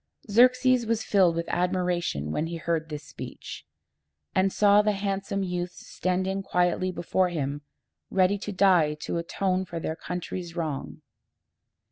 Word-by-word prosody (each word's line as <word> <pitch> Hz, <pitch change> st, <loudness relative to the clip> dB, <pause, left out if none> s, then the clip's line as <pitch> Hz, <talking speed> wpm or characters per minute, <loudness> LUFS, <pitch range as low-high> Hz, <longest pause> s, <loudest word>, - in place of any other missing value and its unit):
Xerxes 250 Hz, +1 st, +5 dB
was 225 Hz, -1 st, 0 dB
filled 185 Hz, -5 st, +3 dB
with 170 Hz, 0 st, -2 dB
admiration 180 Hz, -, 0 dB
when 155 Hz, -, -1 dB
he 170 Hz, -, -5 dB
heard 160 Hz, -1 st, -2 dB
this 150 Hz, -1 st, -6 dB
speech, -, -, -9 dB, 0.7 s
and 190 Hz, +1 st, +2 dB
saw 205 Hz, +1 st, +5 dB
the 210 Hz, 0 st, +1 dB
handsome 195 Hz, 0 st, -2 dB
youths 180 Hz, -1 st, -4 dB
standing 190 Hz, +1 st, -1 dB
quietly 180 Hz, 0 st, +1 dB
before 180 Hz, +1 st, 0 dB
him, 145 Hz, -3 st, -3 dB, 0.5 s
ready 195 Hz, +1 st, +2 dB
to 210 Hz, -, -5 dB
die 180 Hz, -6 st, +4 dB
to 170 Hz, -, -2 dB
atone 185 Hz, +2 st, -1 dB
for 170 Hz, -2 st, -6 dB
their 160 Hz, -, -3 dB
country's 180 Hz, 0 st, -5 dB
wrong. 155 Hz, -5 st, -4 dB
180 Hz, 140 wpm, -27 LUFS, 170-195 Hz, 0.7 s, Xerxes